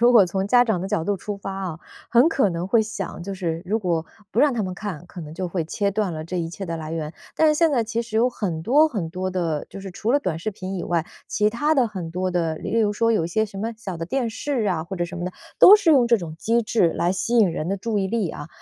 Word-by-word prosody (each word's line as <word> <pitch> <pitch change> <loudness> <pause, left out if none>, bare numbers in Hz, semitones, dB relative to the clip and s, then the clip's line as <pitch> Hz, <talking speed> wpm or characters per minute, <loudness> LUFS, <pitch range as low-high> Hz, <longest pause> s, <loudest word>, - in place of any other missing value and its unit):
如 240 +1 +6
果 225 -5 +8
从 190 +2 -2
家 245 +4 +5
长 220 -7 0
的 190 - -4
角 165 - 0
度 205 +3 +1
出 205 +2 -5
发 195 0 -6
啊， 185 -4 -4 0.3
很 240 +4 +5
可 270 -9 +2
能 170 0 -3
会 220 +3 +4
想， 195 -5 -5
就 195 +2 -5
是 170 -3 -3
如 215 +4 +1
果 170 -5 -1 0.3
不 230 - +1
让 290 -1 +5
他 225 - 0
们 185 -2 -3
看， 180 -4 -6
可 180 - -9
能 155 -1 -8
就 185 +2 -3
会 175 0 -2
切 200 +5 -1
断 200 -2 -1
了 155 0 -5
这 180 +2 -3
一 165 -1 -2
切 185 +4 -6
的 170 -2 -3
来 155 0 -6
源。 160 -2 -4 0.2
但 320 - +4
是 305 - +5
现 325 +1 +3
在 245 -5 +1
其 225 +1 -2
实 230 -2 -4
有 240 +3 +3
很 180 -9 -3
多 290 - +5
很 195 - -3
多 185 +2 -3
的， 170 -5 -2
就 - - -9
是 195 0 -7
除 210 +5 -2
了 285 - +4
短 180 - -2
视 195 +6 -3
频 190 -1 -6
以 180 - -3
外， 170 -2 0 0.2
其 210 0 +2
他 295 +8 +1
的 260 -5 +3
很 185 -6 -6
多 185 +2 -1
的， 165 -3 0
例 230 +8 -1
如 210 -1 +2
说 230 +2 +2
有 210 -7 +1
一 - - -6
些 220 +5 +1
什 200 -2 -9
么 225 +3 -2
小 195 -5 -6
的 165 - -4
电 250 +1 -1
视 250 -1 -2
啊， 175 -5 0
或 190 +3 -6
者 175 - 0
什 175 - -7
么 175 - -3
的， 180 - -4 0.3
都 405 - +10
是 400 -6 +2
用 260 -6 +5
这 235 - +5
种 170 -6 -6
机 230 +4 +1
制 215 -6 +2
来 175 +1 +1
吸 230 +5 0
引 205 -7 +5
人 160 -1 -3
的 195 - 0
注 215 +2 -2
意 195 - 0
力 205 -4 -1
啊。 145 - -8
195 Hz, 320 characters per minute, -23 LUFS, 175-230 Hz, 0.3 s, 都